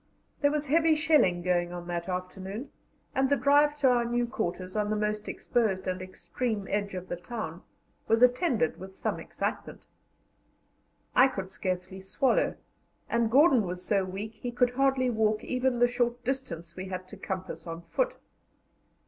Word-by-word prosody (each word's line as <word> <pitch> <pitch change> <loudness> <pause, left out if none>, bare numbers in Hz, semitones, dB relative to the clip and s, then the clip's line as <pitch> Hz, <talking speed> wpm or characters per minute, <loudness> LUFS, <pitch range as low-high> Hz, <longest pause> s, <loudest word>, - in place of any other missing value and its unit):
There 285 - +5
was 300 0 -1
heavy 320 +2 +4
shelling 300 - +3
going 175 -1 +1
on 175 -1 -6
that 175 +1 -3
afternoon, 190 +6 -5 0.4
and 265 0 +2
the 285 - +4
drive 290 +1 +4
to 265 - +6
our 240 -1 +3
new 240 +1 0
quarters, 185 -6 -4
on 210 -1 0
the 215 - +1
most 210 0 -1
exposed 200 -6 0
and 185 0 -2
extreme 195 +4 -3
edge 200 -1 -1
of 185 0 -6
the - - -3
town, 175 -3 -6 0.5
was 225 +2 +4
attended 250 - +3
with 190 0 -9
some - - -2
excitement. - - -4 1.3
I 255 - +8
could 195 -8 -5
scarcely 185 0 -4
swallow, 265 - +1 0.6
and 235 -1 +2
Gordon 270 0 +6
was 180 +1 -5
so 200 -2 +2
weak 195 +4 -5
he 245 - -5
could 245 0 +2
hardly 260 -1 +2
walk 220 -1 +1
even 255 0 0
the 245 0 +5
short 245 0 -1
distance 170 -11 -4
we 185 - -5
had 185 0 -5
to - - -9
compass 190 -2 -5
on 165 +1 -6
foot. - - -1
215 Hz, 165 wpm, -29 LUFS, 185-255 Hz, 1.3 s, I